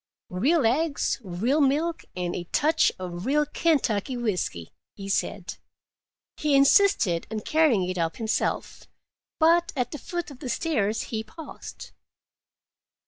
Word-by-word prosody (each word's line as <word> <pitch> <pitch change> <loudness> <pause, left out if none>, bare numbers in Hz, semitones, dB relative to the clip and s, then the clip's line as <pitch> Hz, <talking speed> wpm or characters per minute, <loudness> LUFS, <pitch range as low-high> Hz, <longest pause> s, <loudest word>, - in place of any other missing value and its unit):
"Real 265 - +2
eggs, 285 +6 +1
real 220 - 0
milk, 305 +5 +1
and 180 -1 -2
a 175 - -4
touch 305 - +2
of 180 +2 -6
real 295 +2 +3
Kentucky 270 -7 0
whisky," 180 - -2 0.2
he 195 -1 -8
said. 195 -1 -2 0.8
He 300 -2 +1
insisted 275 - +4
on 220 -1 -4
carrying 265 - +2
it 185 -1 -3
up 165 -1 -1
himself, 220 -1 -2 0.5
but 340 +2 +4
at 250 -3 -1
the 300 - -6
foot 345 0 -5
of 265 - -12
the 260 - -6
stairs 225 -9 0
he 220 0 -1
paused. 300 +9 -10
245 Hz, 135 wpm, -26 LUFS, 195-310 Hz, 0.8 s, insisted